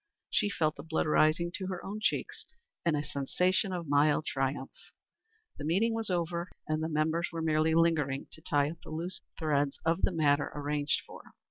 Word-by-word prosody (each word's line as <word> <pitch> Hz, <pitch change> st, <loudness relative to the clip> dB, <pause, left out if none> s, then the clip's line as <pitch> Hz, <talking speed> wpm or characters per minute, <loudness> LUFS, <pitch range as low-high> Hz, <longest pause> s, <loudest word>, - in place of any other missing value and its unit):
She 205 Hz, -, +3 dB
felt 155 Hz, -6 st, 0 dB
the -, -, -6 dB
blood 160 Hz, -1 st, 0 dB
rising 155 Hz, +2 st, +3 dB
to 190 Hz, -, -4 dB
her 185 Hz, -2 st, -5 dB
own 205 Hz, +2 st, -4 dB
cheeks, -, -, -1 dB, 0.4 s
and 165 Hz, -3 st, +2 dB
a 145 Hz, -, -1 dB
sensation 180 Hz, +8 st, 0 dB
of 175 Hz, -3 st, -4 dB
mild 145 Hz, +2 st, +3 dB
triumph. 135 Hz, 0 st, -2 dB, 0.9 s
The -, -, -5 dB
meeting 195 Hz, +9 st, +2 dB
was 225 Hz, -2 st, -1 dB
over 170 Hz, 0 st, -1 dB, 0.2 s
and 155 Hz, 0 st, 0 dB
the 160 Hz, -, -1 dB
members 160 Hz, +2 st, +1 dB
were 165 Hz, -1 st, -3 dB
merely 160 Hz, 0 st, +2 dB
lingering 155 Hz, -5 st, +2 dB
to 160 Hz, -, -12 dB
tie 145 Hz, -1 st, +1 dB
up 165 Hz, -, -12 dB
the -, -, -11 dB
loose 170 Hz, +4 st, -4 dB, 0.2 s
threads 145 Hz, -3 st, +1 dB
of 165 Hz, +3 st, +2 dB
the -, -, +2 dB
matter 145 Hz, -3 st, +2 dB
arranged 145 Hz, 0 st, 0 dB
for. -, -, -13 dB
160 Hz, 190 wpm, -31 LUFS, 145-170 Hz, 0.9 s, She